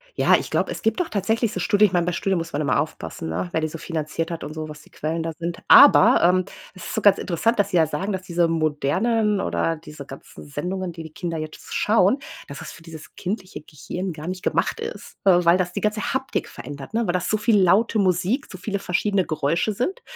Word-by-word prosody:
Ja, -, -, +5 dB
ich -, -, -2 dB
glaube, -, -, 0 dB
es -, -, -6 dB
gibt 225 Hz, -, 0 dB
doch 360 Hz, -, 0 dB
tatsächlich 220 Hz, +2 st, 0 dB
so 185 Hz, -, -3 dB
Studien 205 Hz, +3 st, +1 dB
ich 185 Hz, -, -9 dB
meine, 175 Hz, -1 st, +2 dB
bei 180 Hz, -, 0 dB
Studien 190 Hz, +2 st, 0 dB
muss 165 Hz, 0 st, -4 dB
man 145 Hz, -, -1 dB
immer 130 Hz, -5 st, +1 dB
aufpassen, 80 Hz, -, -5 dB
ne, 90 Hz, +2 st, -2 dB
wer -, -, 0 dB
die 155 Hz, -, 0 dB
so 165 Hz, -, -7 dB
finanziert 160 Hz, 0 st, -3 dB
hat 165 Hz, -1 st, -5 dB
und 150 Hz, -, -6 dB
so, 155 Hz, 0 st, -5 dB
was 150 Hz, 0 st, -10 dB
die -, -, -21 dB
Quellen 160 Hz, +2 st, -3 dB
da 165 Hz, -, -3 dB
sind, 170 Hz, 0 st, -4 dB
aber, -, -, +8 dB
ähm, 180 Hz, +1 st, +4 dB, 0.3 s
es 185 Hz, -, -10 dB
ist -, -, -5 dB
so 220 Hz, -, 0 dB
ganz 200 Hz, -1 st, +6 dB
interessant, 215 Hz, +6 st, 0 dB
dass 200 Hz, 0 st, +2 dB
sie 180 Hz, -, +2 dB
ja 160 Hz, -2 st, +4 dB
sagen, 185 Hz, +7 st, -3 dB
dass 185 Hz, -, -3 dB
diese 175 Hz, -2 st, +1 dB
modernen 190 Hz, +8 st, +1 dB
oder 165 Hz, -1 st, -1 dB
diese 150 Hz, -3 st, -11 dB
ganzen 135 Hz, -, -12 dB
Sendungen, 180 Hz, +5 st, -4 dB
die 165 Hz, 0 st, -9 dB
die 160 Hz, -1 st, -11 dB
Kinder 175 Hz, -5 st, -4 dB
jetzt 155 Hz, 0 st, -8 dB
schauen, 210 Hz, +3 st, +3 dB, 0.3 s
dass 140 Hz, -, -8 dB
das -, -, -8 dB
für 165 Hz, -, -15 dB
dieses 160 Hz, -2 st, -12 dB
kindliche 185 Hz, -4 st, -5 dB
Gehirn 175 Hz, +5 st, -6 dB
gar 155 Hz, +2 st, -8 dB
nicht 185 Hz, 0 st, -5 dB
gemacht -, -, 0 dB
ist, 455 Hz, +1 st, -7 dB
weil 175 Hz, -2 st, +5 dB
das 180 Hz, -1 st, -1 dB
die -, -, -3 dB
ganze 215 Hz, +1 st, -1 dB
Haptik 265 Hz, 0 st, -2 dB
verändert, 140 Hz, -, -9 dB
ne, 230 Hz, 0 st, +1 dB
weil 175 Hz, -, 0 dB
das 180 Hz, -, -1 dB
so 215 Hz, -, +2 dB
viel 215 Hz, 0 st, +3 dB
laute 205 Hz, +5 st, +3 dB
Musik, 190 Hz, -, +1 dB
so 185 Hz, -, -8 dB
viele 200 Hz, +2 st, -3 dB
verschiedene 195 Hz, +1 st, 0 dB
Geräusche 165 Hz, +7 st, 0 dB
sind, 370 Hz, -, -2 dB
180 Hz, 240 wpm, -23 LUFS, 160-205 Hz, 0.3 s, aber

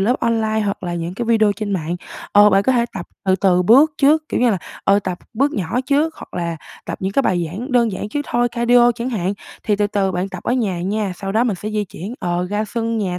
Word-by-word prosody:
lớp 235 Hz, +7 st, +2 dB
online 220 Hz, -2 st, +1 dB
hoặc 200 Hz, -2 st, -2 dB
là 175 Hz, -1 st, -3 dB
những 170 Hz, +1 st, -4 dB
cái 235 Hz, +4 st, -3 dB
video 220 Hz, -2 st, +3 dB
trên 205 Hz, 0 st, -4 dB
mạng. 175 Hz, -1 st, -2 dB, 0.4 s
Ờ, 205 Hz, 0 st, +7 dB
bạn 195 Hz, 0 st, +4 dB
có 260 Hz, -, +2 dB
thể 235 Hz, -1 st, +2 dB
tập 180 Hz, -3 st, -5 dB, 0.2 s
từ 190 Hz, 0 st, +3 dB
từ 180 Hz, -1 st, +3 dB
bước 270 Hz, -, +6 dB
trước, 305 Hz, +2 st, +3 dB
kiểu -, -, -1 dB
như 245 Hz, -1 st, +4 dB
là, 195 Hz, -, 0 dB, 0.3 s
ờ, 200 Hz, +1 st, +4 dB
tập 185 Hz, -3 st, -4 dB, 0.2 s
bước 275 Hz, +5 st, +1 dB
nhỏ 200 Hz, +5 st, -1 dB
trước 300 Hz, +3 st, +1 dB
hoặc -, -, -12 dB
là 170 Hz, -2 st, -2 dB, 0.3 s
tập -, -, -5 dB
những 190 Hz, +1 st, -2 dB
cái 275 Hz, -, +2 dB
bài 175 Hz, -6 st, +1 dB
giảng 230 Hz, -, -6 dB
đơn 235 Hz, -3 st, +3 dB
giản 205 Hz, -, -4 dB
trước 290 Hz, +6 st, -2 dB
thôi, 240 Hz, 0 st, +1 dB
cardio 240 Hz, 0 st, +4 dB
chẳng 235 Hz, +2 st, -4 dB
hạn. 195 Hz, -4 st, -1 dB, 0.3 s
Thì 210 Hz, -2 st, +1 dB
từ 205 Hz, 0 st, +2 dB
từ 200 Hz, -2 st, 0 dB
bạn 180 Hz, +2 st, -2 dB
tập 190 Hz, -2 st, -8 dB
ở -, -, 0 dB
nhà 205 Hz, -9 st, 0 dB
nha, 200 Hz, 0 st, -1 dB
sau 195 Hz, +1 st, -4 dB
đó 225 Hz, +3 st, +3 dB
mình 215 Hz, -6 st, 0 dB
sẽ 210 Hz, -, -5 dB
di 210 Hz, -1 st, -1 dB
chuyển, 195 Hz, +5 st, -8 dB
ờ, 175 Hz, 0 st, -1 dB
ra 210 Hz, +1 st, 0 dB
sân 230 Hz, +1 st, -2 dB
nhà 180 Hz, -4 st, -2 dB
210 Hz, 265 wpm, -19 LUFS, 185-235 Hz, 0.4 s, Ờ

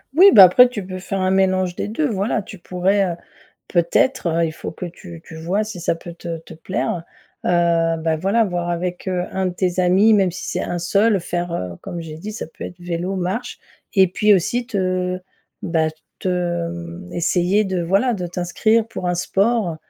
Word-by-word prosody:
Oui 380 Hz, +5 st, +9 dB
bah 200 Hz, -4 st, +10 dB
après 245 Hz, +8 st, +7 dB
tu 210 Hz, -6 st, -5 dB
peux 185 Hz, 0 st, -6 dB
faire 195 Hz, +1 st, -3 dB
un 185 Hz, 0 st, +1 dB
mélange 185 Hz, -2 st, +2 dB
des -, -, -3 dB
2 285 Hz, +8 st, 0 dB
voilà. 210 Hz, -1 st, -1 dB
Tu 200 Hz, -, -11 dB
pourrais, 185 Hz, +3 st, +1 dB
heu, -, -, -7 dB, 0.5 s
peut-être, 175 Hz, +6 st, +2 dB
heu, 165 Hz, 0 st, +1 dB
il 160 Hz, -, -4 dB
faut -, -, -7 dB
que 180 Hz, -, -6 dB
tu 170 Hz, -1 st, -11 dB
tu 160 Hz, -, -11 dB
vois 180 Hz, +7 st, -1 dB
si 215 Hz, -4 st, -7 dB
ça 170 Hz, -, +1 dB
peut 170 Hz, +1 st, -10 dB
te 170 Hz, -1 st, -6 dB
te 160 Hz, -, -13 dB
plaire. 170 Hz, +1 st, -3 dB, 0.4 s
Heu, 170 Hz, -1 st, +2 dB
bah 160 Hz, 0 st, 0 dB
voilà 200 Hz, +8 st, +2 dB
voir 175 Hz, -3 st, -2 dB
avec, 175 Hz, +2 st, -3 dB
heu, 180 Hz, -1 st, -1 dB
1 190 Hz, 0 st, 0 dB
de 180 Hz, -, -1 dB
tes 180 Hz, 0 st, 0 dB
amis, 190 Hz, +5 st, +5 dB
même 195 Hz, -3 st, +3 dB
si 180 Hz, -, -7 dB
c'est -, -, -2 dB
1 175 Hz, -, -3 dB
seul 200 Hz, +4 st, +2 dB
faire, 175 Hz, 0 st, -3 dB
heu, 90 Hz, -, -4 dB
comme 175 Hz, -, -6 dB
j'ai 160 Hz, -2 st, -8 dB
dit, 205 Hz, +7 st, -7 dB
ça 215 Hz, -, -5 dB
peut 160 Hz, -, -10 dB
être 175 Hz, -, -8 dB
vélo, 175 Hz, +2 st, -3 dB
marche 190 Hz, +7 st, -3 dB, 0.3 s
et 190 Hz, -3 st, +5 dB
puis 210 Hz, +4 st, +3 dB
aussi 235 Hz, +6 st, +1 dB
te 185 Hz, -4 st, -1 dB, 0.4 s
bah 165 Hz, -3 st, +1 dB, 0.3 s
te 175 Hz, -2 st, -1 dB
mmh, 175 Hz, +1 st, -8 dB
essayer 180 Hz, +4 st, +2 dB
de 190 Hz, -3 st, -1 dB
voilà 195 Hz, +8 st, +2 dB
de 180 Hz, -4 st, -4 dB
t'inscrire 215 Hz, +6 st, +1 dB
pour 180 Hz, -, -4 dB
un 175 Hz, -, +1 dB
sport. 195 Hz, 0 st, +1 dB
180 Hz, 205 wpm, -20 LUFS, 170-195 Hz, 0.5 s, bah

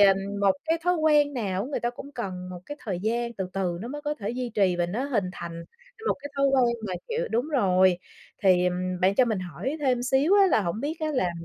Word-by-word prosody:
ờ, 195 Hz, -1 st, +7 dB, 0.3 s
một 200 Hz, -1 st, +5 dB
cái 325 Hz, +1 st, +1 dB
thói 360 Hz, -, +3 dB
quen 295 Hz, -3 st, +3 dB
nào 195 Hz, -5 st, -1 dB
á 245 Hz, -, -5 dB
người -, -, -2 dB
ta 240 Hz, -, 0 dB
cũng 275 Hz, +4 st, -10 dB
cần 185 Hz, -6 st, -5 dB
một 180 Hz, -1 st, -7 dB
cái 290 Hz, -, -6 dB
thời 190 Hz, -5 st, -2 dB
gian 235 Hz, +3 st, -1 dB
từ 195 Hz, -5 st, -4 dB
từ 180 Hz, -3 st, -1 dB
nó 235 Hz, -, -5 dB
mới 295 Hz, +3 st, -6 dB
có 295 Hz, 0 st, -1 dB
thể 205 Hz, -5 st, -4 dB
duy 245 Hz, 0 st, -3 dB
trì 190 Hz, -4 st, +3 dB
và 175 Hz, 0 st, +1 dB
nó 215 Hz, +10 st, -2 dB
hình 240 Hz, -9 st, 0 dB
thành 170 Hz, -2 st, -7 dB, 0.4 s
một -, -, +3 dB
cái 285 Hz, -, -6 dB
thói 275 Hz, 0 st, +3 dB
quen 255 Hz, -3 st, +3 dB
mà, 185 Hz, -, -3 dB
kiểu 470 Hz, +2 st, -1 dB
đúng 240 Hz, +6 st, 0 dB
rồi, 185 Hz, -, +3 dB, 0.4 s
thì, 185 Hz, -2 st, +5 dB
ừm, 180 Hz, 0 st, -2 dB
bạn 190 Hz, +2 st, +3 dB
cho 255 Hz, -, +5 dB
mình 220 Hz, -4 st, -1 dB
hỏi 185 Hz, -, -4 dB
thêm 255 Hz, -4 st, +1 dB
xíu 270 Hz, +9 st, +3 dB
á 400 Hz, -1 st, +6 dB
là 340 Hz, -, +3 dB
hổng 185 Hz, +2 st, -2 dB
biết 300 Hz, +5 st, -2 dB
á 310 Hz, -, 0 dB
là 185 Hz, -9 st, +1 dB
230 Hz, 255 wpm, -26 LUFS, 185-275 Hz, 0.4 s, ờ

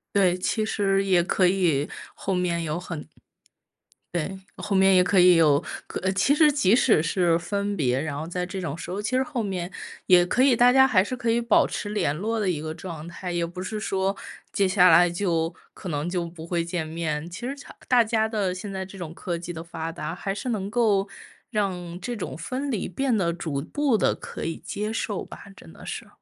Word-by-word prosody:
对， 185 Hz, -3 st, +4 dB
其 215 Hz, +4 st, -1 dB
实 195 Hz, -2 st, +1 dB
也 185 Hz, -3 st, +3 dB
可 185 Hz, +2 st, +2 dB
以 175 Hz, -6 st, +2 dB, 0.2 s
后 195 Hz, -, -3 dB
面 175 Hz, -2 st, 0 dB
有 155 Hz, +1 st, -2 dB
很 175 Hz, -4 st, -6 dB, 1.1 s
对， 175 Hz, +3 st, -3 dB, 0.2 s
后 205 Hz, -1 st, -3 dB
面 190 Hz, 0 st, +5 dB
也 180 Hz, -, +6 dB
可 180 Hz, +1 st, +3 dB
以 180 Hz, 0 st, +7 dB
有， 150 Hz, -4 st, +4 dB, 0.2 s
可 -, -, -5 dB
呃， 190 Hz, 0 st, +1 dB
其 200 Hz, +9 st, +3 dB
实 300 Hz, 0 st, +5 dB
即 230 Hz, -8 st, +3 dB
使 225 Hz, -10 st, +4 dB
是 170 Hz, 0 st, +2 dB
分 200 Hz, +4 st, -2 dB
别， 130 Hz, -4 st, +1 dB
然 145 Hz, -2 st, -3 dB
后 155 Hz, -, -4 dB
在 180 Hz, +1 st, -3 dB
这 190 Hz, +2 st, -5 dB
种 165 Hz, -6 st, -3 dB
时 165 Hz, -, -8 dB
候， 190 Hz, +3 st, -3 dB
其 210 Hz, -, -3 dB
实 260 Hz, -, +3 dB
后 260 Hz, -5 st, -3 dB
面 185 Hz, -3 st, -3 dB, 0.4 s
也 180 Hz, -1 st, +6 dB
可 245 Hz, -, +1 dB
以 260 Hz, -2 st, +5 dB
大 245 Hz, +2 st, +5 dB
家 265 Hz, 0 st, +7 dB
还 195 Hz, -7 st, +4 dB
是 255 Hz, -, -4 dB
可 240 Hz, -2 st, -2 dB
以 230 Hz, +1 st, +3 dB
保 235 Hz, -2 st, +3 dB
持 205 Hz, -, -4 dB
联 205 Hz, -9 st, 0 dB
络 220 Hz, +7 st, -2 dB
的 200 Hz, -3 st, +1 dB
一 160 Hz, -, -1 dB
个 155 Hz, +1 st, -4 dB
状 165 Hz, -2 st, -8 dB
态， 180 Hz, +1 st, -6 dB
也 170 Hz, -1 st, 0 dB
不 180 Hz, +2 st, -7 dB
是 215 Hz, +3 st, -4 dB
说 195 Hz, -1 st, -1 dB, 0.3 s
接 195 Hz, -, +2 dB
下 185 Hz, -1 st, +5 dB
来 170 Hz, +2 st, +7 dB
就 170 Hz, -2 st, -1 dB, 0.2 s
可 185 Hz, -, -7 dB
能 150 Hz, +1 st, -2 dB
就 175 Hz, -1 st, -1 dB
不 165 Hz, -1 st, -10 dB
会 170 Hz, -1 st, -1 dB
见 170 Hz, -2 st, -3 dB
面。 160 Hz, -1 st, -3 dB
其 185 Hz, +6 st, -9 dB
实 275 Hz, -, -3 dB
强 280 Hz, -, -13 dB
大 245 Hz, -2 st, +5 dB
家 220 Hz, 0 st, +1 dB
的 205 Hz, -5 st, -1 dB
现 195 Hz, +1 st, -6 dB
在 190 Hz, -, -3 dB
这 190 Hz, +1 st, -11 dB
种 170 Hz, -3 st, -6 dB
科 175 Hz, -1 st, -4 dB
技 175 Hz, +1 st, -6 dB
的 165 Hz, 0 st, -6 dB
发 165 Hz, -1 st, -5 dB
达， 160 Hz, +1 st, -5 dB
还 195 Hz, +2 st, -3 dB
是 245 Hz, +5 st, -4 dB
能 200 Hz, -3 st, -2 dB
够 210 Hz, -4 st, +2 dB, 0.4 s
让 180 Hz, -5 st, -2 dB
这 245 Hz, +5 st, -3 dB
种 205 Hz, -, -5 dB
分 260 Hz, -, -4 dB
离 215 Hz, -6 st, -2 dB
变 265 Hz, +5 st, 0 dB
得 180 Hz, -5 st, +1 dB
逐 155 Hz, -5 st, -3 dB
步 280 Hz, -, 0 dB
地 210 Hz, -, +2 dB
可 -, -, -8 dB
以 165 Hz, -, -3 dB
接 210 Hz, +2 st, -4 dB
受 215 Hz, -3 st, -2 dB
吧， -, -, -11 dB
真 80 Hz, -, -14 dB
的 -, -, -13 dB
是。 -, -, -6 dB
185 Hz, 245 characters per minute, -25 LUFS, 170-210 Hz, 1.1 s, 以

